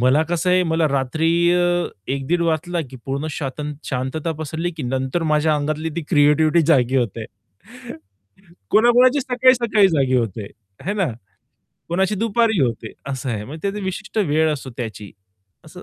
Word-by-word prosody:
मला 130 Hz, +5 st, +4 dB
कसं 175 Hz, +1 st, 0 dB
आहे 180 Hz, 0 st, +4 dB
मला 160 Hz, -1 st, +2 dB
रात्री 140 Hz, +4 st, 0 dB, 0.2 s
अ, 175 Hz, 0 st, +2 dB, 0.3 s
1:00-1:30 140 Hz, +6 st, -1 dB
वाजला, 170 Hz, +1 st, -1 dB
की 130 Hz, -, -9 dB
पूर्ण 140 Hz, +3 st, -3 dB
स्वत 140 Hz, -2 st, -5 dB, 0.3 s
शांतता 135 Hz, +5 st, -2 dB
पसरली, 160 Hz, +3 st, -3 dB
की 155 Hz, -, -5 dB
नंतर 130 Hz, +5 st, -2 dB
माझ्या 155 Hz, +1 st, +2 dB
अंगातली 155 Hz, +2 st, -2 dB
ती 170 Hz, -, -2 dB
क्रिएटिव्हिटी 155 Hz, +1 st, +4 dB
जागी 130 Hz, -2 st, +2 dB
होते. 115 Hz, -3 st, -1 dB, 1.5 s
कोणा-कोणाची 245 Hz, +5 st, +5 dB
सकाळी-सकाळी 245 Hz, -5 st, +3 dB
जागी 135 Hz, -6 st, +1 dB
होते, 110 Hz, -3 st, -2 dB, 0.3 s
आहे 195 Hz, -, -3 dB
ना? 195 Hz, -4 st, +1 dB, 0.8 s
कोणाची 190 Hz, +4 st, +1 dB
दुपारी 225 Hz, -1 st, +1 dB
होते 115 Hz, -4 st, -1 dB, 0.2 s
असं 135 Hz, 0 st, -4 dB
आहे. 105 Hz, -2 st, -3 dB
म्हणजे 155 Hz, +7 st, -9 dB
त्याची 200 Hz, 0 st, -3 dB
विशिष्ट 215 Hz, +4 st, -4 dB
वेळ 160 Hz, -5 st, +2 dB
असतो 135 Hz, -3 st, -6 dB
त्याची 110 Hz, -4 st, -6 dB, 0.5 s
असं -, -, -12 dB
155 Hz, 150 wpm, -21 LUFS, 135-185 Hz, 1.5 s, कोणा-कोणाची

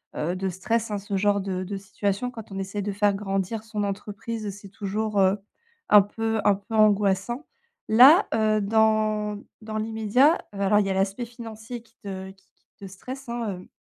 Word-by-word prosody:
heu, 170 Hz, +4 st, -1 dB
de 190 Hz, 0 st, -2 dB
stress, 220 Hz, +5 st, -1 dB
hein, 205 Hz, -, -1 dB
ce 200 Hz, 0 st, -4 dB
genre 200 Hz, +1 st, +2 dB
de 190 Hz, -1 st, -3 dB
de 195 Hz, +1 st, -5 dB
situation 200 Hz, +4 st, -2 dB
quand 225 Hz, -4 st, -10 dB
on 195 Hz, -, -5 dB
essaye 195 Hz, +2 st, -3 dB
de 205 Hz, -, -2 dB
faire 205 Hz, 0 st, +2 dB
grandir 195 Hz, +2 st, -2 dB
son 210 Hz, -2 st, -3 dB
entreprise, 210 Hz, +2 st, -5 dB
c'est 200 Hz, -, -12 dB
toujours, 205 Hz, +2 st, -3 dB
heu, 190 Hz, +2 st, +4 dB, 0.5 s
un 210 Hz, -1 st, +9 dB
peu 225 Hz, +2 st, -2 dB
un 205 Hz, -1 st, +4 dB
peu 210 Hz, +3 st, -7 dB
angoissant. 210 Hz, +4 st, +2 dB, 0.4 s
Là, 275 Hz, -, +8 dB
heu, 215 Hz, -1 st, +2 dB
dans 215 Hz, 0 st, +1 dB, 0.2 s
dans 215 Hz, 0 st, -5 dB
l'immédiat, 225 Hz, +8 st, +3 dB, 0.2 s
heu, 200 Hz, -, -8 dB
alors 205 Hz, +1 st, +3 dB
il 200 Hz, -, +1 dB
y -, -, -2 dB
a -, -, +1 dB
l'aspect 195 Hz, +5 st, -1 dB
financier 230 Hz, 0 st, -8 dB
qui 230 Hz, +1 st, -28 dB
te 190 Hz, -1 st, -6 dB
qui 190 Hz, -, -24 dB
qui -, -, -44 dB
te 200 Hz, -, -9 dB
stresse, 255 Hz, +7 st, -9 dB
hein, 235 Hz, -2 st, -2 dB
hem, -, -, -16 dB
210 Hz, 195 wpm, -25 LUFS, 195-225 Hz, 0.5 s, un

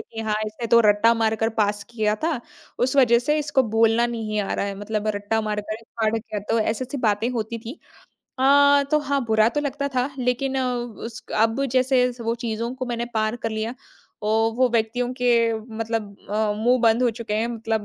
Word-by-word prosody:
कि 225 Hz, -, -4 dB
हाँ, 220 Hz, -1 st, -1 dB
इसने 215 Hz, +2 st, -5 dB
तो 235 Hz, +1 st, +6 dB
रट्टा 205 Hz, +3 st, +5 dB
मारकर 225 Hz, -1 st, +1 dB
पास 205 Hz, 0 st, -1 dB
किया 215 Hz, -3 st, 0 dB
था। 320 Hz, -7 st, 0 dB, 0.4 s
उस 255 Hz, +3 st, +1 dB
वज़ह 240 Hz, -3 st, +6 dB
से 300 Hz, +5 st, 0 dB
इसको 290 Hz, -3 st, +1 dB, 0.2 s
बोलना 225 Hz, +1 st, +4 dB
नहीं 220 Hz, -3 st, -3 dB
आ 200 Hz, -, -3 dB
रहा -, -, -1 dB
है, 200 Hz, 0 st, -3 dB
मतलब 210 Hz, +1 st, -3 dB
रट्टा 205 Hz, +2 st, -1 dB
मारकर 215 Hz, +1 st, -4 dB, 0.2 s
पास 220 Hz, -1 st, +3 dB
किया। 215 Hz, -2 st, -6 dB
तो 230 Hz, -, +2 dB
ऐसी-ऐसी 240 Hz, +5 st, -2 dB
बातें 210 Hz, +2 st, +1 dB
होती 230 Hz, -1 st, -3 dB
थीं। 230 Hz, +4 st, -8 dB, 0.6 s
अ, 285 Hz, +1 st, +5 dB
तो 305 Hz, -, +4 dB
हाँ, 280 Hz, -3 st, -1 dB
बुरा 220 Hz, 0 st, +3 dB
तो 295 Hz, -, -2 dB
लगता 280 Hz, 0 st, -2 dB
था, 250 Hz, +1 st, +1 dB
लेकिन 260 Hz, +2 st, 0 dB
उस 240 Hz, -2 st, -4 dB
अब 225 Hz, +5 st, +2 dB
जैसे 255 Hz, -1 st, +3 dB
वो 230 Hz, 0 st, -1 dB
चीज़ों 230 Hz, +2 st, -3 dB
को 255 Hz, -1 st, -5 dB
मैंने 235 Hz, -1 st, -2 dB
पार 220 Hz, +1 st, 0 dB
कर 225 Hz, -, 0 dB
लिया। 220 Hz, +2 st, -3 dB, 0.5 s
ओ, 220 Hz, +1 st, +2 dB
वो 255 Hz, +1 st, +3 dB
व्यक्तियों 235 Hz, +2 st, 0 dB
के 250 Hz, -, +2 dB, 0.5 s
मतलब 225 Hz, -2 st, -2 dB, 0.5 s
मुँह 240 Hz, +4 st, +3 dB
बंद 230 Hz, +1 st, +3 dB
हो 245 Hz, -, +3 dB
चुके 225 Hz, -2 st, -5 dB
हैं। 220 Hz, +2 st, +1 dB
मतलब 225 Hz, -2 st, -2 dB
230 Hz, 190 wpm, -23 LUFS, 220-250 Hz, 0.6 s, तो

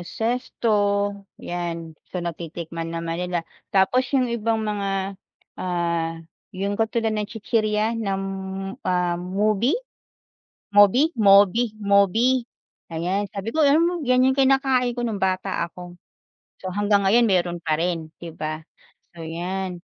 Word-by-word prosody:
yung 175 Hz, -, -9 dB
zesto, 240 Hz, +1 st, -2 dB, 0.7 s
'yan. 170 Hz, -2 st, -5 dB, 0.2 s
So 180 Hz, -2 st, -4 dB
natitikman 165 Hz, 0 st, -5 dB
naman 165 Hz, 0 st, -3 dB
nila, 180 Hz, -2 st, -2 dB, 0.2 s
tapos 245 Hz, +7 st, +2 dB
yung 250 Hz, -3 st, +1 dB
ibang 225 Hz, -1 st, 0 dB
mga, 195 Hz, -2 st, -2 dB, 0.4 s
ah, 170 Hz, -2 st, -2 dB, 0.3 s
yung 200 Hz, +2 st, -1 dB
katulad 225 Hz, 0 st, 0 dB
ng 210 Hz, -1 st, -2 dB
chichirya 215 Hz, -1 st, 0 dB
nam 195 Hz, -2 st, -1 dB, 0.6 s
ah, 180 Hz, -1 st, 0 dB
mobi? 210 Hz, -, +1 dB, 1.0 s
Mobi, 205 Hz, +9 st, +6 dB
mobi, 205 Hz, +2 st, +5 dB
mobi, 210 Hz, +6 st, +3 dB, 0.5 s
ayan. 180 Hz, +5 st, -1 dB
Sabi 200 Hz, +1 st, -5 dB
ko, 315 Hz, -1 st, +4 dB
alam 290 Hz, +3 st, +5 dB
mo 340 Hz, +1 st, +2 dB
'yan 255 Hz, 0 st, +4 dB
yung 265 Hz, -, +1 dB
kinakain 265 Hz, -2 st, +3 dB
ko 240 Hz, -, -5 dB
no'ng 210 Hz, -3 st, -4 dB
bata 190 Hz, 0 st, 0 dB
ako. 175 Hz, +1 st, -10 dB, 0.6 s
So 185 Hz, -, -5 dB
hanggang 205 Hz, -1 st, +3 dB
ngayon 235 Hz, +4 st, +5 dB
meron 180 Hz, -5 st, +1 dB
pa 155 Hz, -1 st, 0 dB
rin, 165 Hz, -2 st, -2 dB
'di 165 Hz, -2 st, -9 dB
ba? 155 Hz, 0 st, -4 dB, 0.6 s
So, 165 Hz, -, -7 dB
'yan. 180 Hz, +2 st, -4 dB
195 Hz, 130 wpm, -23 LUFS, 175-225 Hz, 1.0 s, Mobi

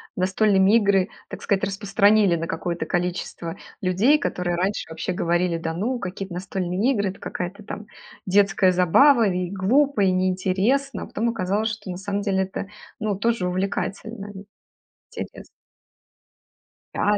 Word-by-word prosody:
настольные 195 Hz, +2 st, +3 dB
игры, 200 Hz, -4 st, +2 dB, 0.2 s
так -, -, -8 dB
сказать, 195 Hz, -1 st, 0 dB
распространили 200 Hz, -1 st, +3 dB
на 165 Hz, +1 st, -4 dB
какое-то 175 Hz, -1 st, -3 dB
количество 175 Hz, -2 st, -3 dB, 0.2 s
людей, 200 Hz, +11 st, +3 dB
которые 180 Hz, -10 st, -2 dB
раньше 190 Hz, +4 st, -1 dB
вообще 160 Hz, +3 st, -4 dB
говорили: 175 Hz, 0 st, 0 dB
"Да 165 Hz, 0 st, -3 dB
ну, 240 Hz, +8 st, -2 dB
какие-то 190 Hz, -1 st, -6 dB
настольные 185 Hz, +5 st, -1 dB
игры- 200 Hz, -3 st, 0 dB
это 195 Hz, -, -9 dB
какая-то 185 Hz, +4 st, -5 dB
там 210 Hz, 0 st, -8 dB, 0.4 s
детская 195 Hz, -1 st, +4 dB
забава. 225 Hz, -, +5 dB
И 180 Hz, -2 st, -1 dB
глупо, 245 Hz, +7 st, +2 dB
и 190 Hz, -2 st, +4 dB
неинтересно". 190 Hz, +9 st, 0 dB
А -, -, -6 dB
потом 235 Hz, +2 st, -1 dB
оказалось, 210 Hz, 0 st, -1 dB
что, 205 Hz, -3 st, -7 dB
на 180 Hz, -, -5 dB
самом 200 Hz, +1 st, -3 dB
деле, 190 Hz, -2 st, +1 dB
это, 190 Hz, +1 st, -5 dB, 0.3 s
ну, 215 Hz, -2 st, -1 dB
тоже 230 Hz, -3 st, 0 dB
увлекательно. 200 Hz, +3 st, -3 dB, 0.8 s
Интерес -, -, -7 dB, 1.5 s
Да, 205 Hz, 0 st, +2 dB
195 Hz, 140 wpm, -23 LUFS, 180-210 Hz, 1.5 s, забава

